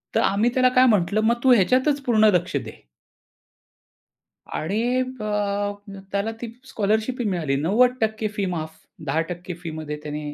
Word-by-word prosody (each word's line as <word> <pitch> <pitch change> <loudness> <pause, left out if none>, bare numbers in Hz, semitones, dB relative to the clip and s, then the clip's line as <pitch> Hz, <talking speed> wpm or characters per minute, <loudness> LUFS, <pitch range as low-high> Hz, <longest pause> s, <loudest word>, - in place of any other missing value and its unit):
तर - - +4
आम्ही 210 +5 +2
त्याला 255 -1 +4
काय 255 +1 +7
म्हटलं, 210 0 +2
"मग 235 +2 +2
तू 260 -1 +6
ह्याच्यातच 260 +7 +3
पूर्ण 220 -4 +3
लक्ष 175 - -1
दे." - - -8 1.8
आणि 200 +8 -1 0.5
अ, 205 0 -1 0.4
त्याला 200 +3 -1
ती 235 -2 -5
स्कॉलरशिप 220 +3 -1
मिळाली 165 -8 0
90% 220 +3 +2
फी 200 -2 -1
माफ. 160 -1 -5 0.3
10% 170 +5 -3
फीमध्ये 155 -2 -5
त्याने 150 0 -5
205 Hz, 135 wpm, -23 LUFS, 170-235 Hz, 1.8 s, काय